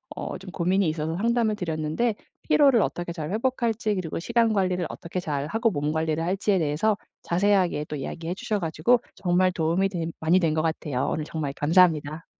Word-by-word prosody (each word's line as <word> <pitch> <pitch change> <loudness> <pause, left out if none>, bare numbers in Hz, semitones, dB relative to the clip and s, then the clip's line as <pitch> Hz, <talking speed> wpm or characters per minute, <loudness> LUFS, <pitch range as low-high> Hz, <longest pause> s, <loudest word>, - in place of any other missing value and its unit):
어 - - -5
좀 185 0 -10
고민이 185 +1 +1
있어서 155 +1 -2
상담을 230 +1 +1
드렸는데 165 +4 -1 0.3
피로를 275 -6 +5
어떻게 175 -2 -2
잘 155 -1 -5
회복할지 225 -2 0
그리고 165 -3 -3
시간 230 +4 +2
관리를 185 -3 0
어떻게 175 +2 -5
잘하고 170 - -1
몸 145 -1 -1
관리를 160 0 -1
할지에 195 +2 +1
대해서 165 +8 +1 0.3
자세하게 180 -4 +2
또 150 - -6
이야기해 165 +5 -4
주셔 210 +1 -2
가지고 170 +9 +2
정말 185 0 +2
도움이 170 +3 +1
된 170 -3 -3
많이 165 +4 +3
된 165 -4 +1
것 155 - +1
같아요. 155 -5 -1
오늘 155 - -2
정말 150 -3 -4
감사합니다. 155 0 +2
175 Hz, 415 characters per minute, -25 LUFS, 155-205 Hz, 0.3 s, 피로를